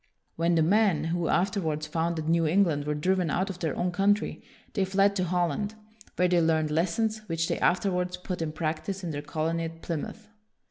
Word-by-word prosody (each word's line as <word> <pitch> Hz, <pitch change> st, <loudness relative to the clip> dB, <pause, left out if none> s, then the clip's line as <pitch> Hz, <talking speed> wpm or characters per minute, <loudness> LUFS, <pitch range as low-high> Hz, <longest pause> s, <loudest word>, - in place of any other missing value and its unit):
When 170 Hz, +1 st, +2 dB
the 160 Hz, -, +4 dB
men 195 Hz, -3 st, +3 dB
who 165 Hz, +1 st, -1 dB
afterwards 170 Hz, -5 st, 0 dB
founded 160 Hz, 0 st, -2 dB
New 165 Hz, 0 st, +3 dB
England 160 Hz, -4 st, +2 dB
were 150 Hz, 0 st, -1 dB
driven 180 Hz, +2 st, +1 dB
out 185 Hz, +6 st, 0 dB
of 180 Hz, -, -10 dB
their 160 Hz, -5 st, -1 dB
own 180 Hz, 0 st, 0 dB
country, 200 Hz, +3 st, +1 dB, 0.3 s
they 200 Hz, -, +1 dB
fled 195 Hz, +1 st, +2 dB
to 185 Hz, -, +1 dB
Holland, 180 Hz, +4 st, -1 dB, 0.4 s
where 180 Hz, -, +3 dB
they 175 Hz, -1 st, +3 dB
learned 160 Hz, -2 st, +2 dB
lessons 190 Hz, +7 st, 0 dB
which 165 Hz, -1 st, -1 dB
they -, -, -1 dB
afterwards 180 Hz, -1 st, +1 dB
put 180 Hz, -1 st, -5 dB
in 160 Hz, -1 st, -1 dB
practice 160 Hz, +5 st, -3 dB
in 170 Hz, -, -3 dB
their 145 Hz, -1 st, -4 dB
colony 160 Hz, +3 st, -2 dB
at 165 Hz, 0 st, -8 dB
Plymouth. 170 Hz, +7 st, -5 dB
170 Hz, 190 wpm, -28 LUFS, 160-190 Hz, 0.4 s, the